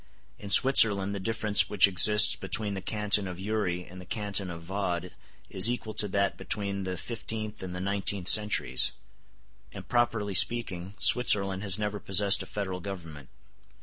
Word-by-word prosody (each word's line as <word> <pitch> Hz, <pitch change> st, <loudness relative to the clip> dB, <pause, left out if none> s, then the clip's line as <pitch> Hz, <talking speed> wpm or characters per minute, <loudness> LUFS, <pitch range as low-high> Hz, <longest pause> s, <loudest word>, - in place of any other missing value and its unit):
In 100 Hz, -, -10 dB
Switzerland 100 Hz, -5 st, +4 dB
the 100 Hz, -, -6 dB
difference 110 Hz, 0 st, +1 dB
which 100 Hz, -1 st, +3 dB
exists 105 Hz, +3 st, +5 dB
between 105 Hz, -2 st, -3 dB
the 95 Hz, -, -7 dB
Canton 105 Hz, 0 st, 0 dB
of 90 Hz, -1 st, -9 dB
Uri 95 Hz, -3 st, -4 dB
and 90 Hz, +1 st, -13 dB
the -, -, -14 dB
Canton 100 Hz, -3 st, -4 dB
of 85 Hz, -1 st, -10 dB
Vaud 90 Hz, -1 st, -5 dB, 0.4 s
is 95 Hz, +4 st, +1 dB
equal 115 Hz, -3 st, -6 dB
to 105 Hz, 0 st, -1 dB
that 100 Hz, 0 st, -2 dB
between 100 Hz, -2 st, -3 dB
the 90 Hz, -1 st, -6 dB
fifteenth 110 Hz, 0 st, -7 dB
and 90 Hz, -1 st, -8 dB
the -, -, -6 dB
nineteenth 100 Hz, -1 st, -3 dB
centuries; 105 Hz, -12 st, +4 dB, 0.8 s
and, -, -, -12 dB
properly 115 Hz, -4 st, -2 dB
speaking, 95 Hz, -2 st, +1 dB
Switzerland 100 Hz, -6 st, +2 dB
has 100 Hz, -2 st, +2 dB
never 105 Hz, -1 st, -5 dB
possessed 100 Hz, +1 st, +3 dB
a -, -, -10 dB
federal 95 Hz, -3 st, -6 dB
government. 85 Hz, -8 st, -10 dB
100 Hz, 160 wpm, -26 LUFS, 95-105 Hz, 0.8 s, exists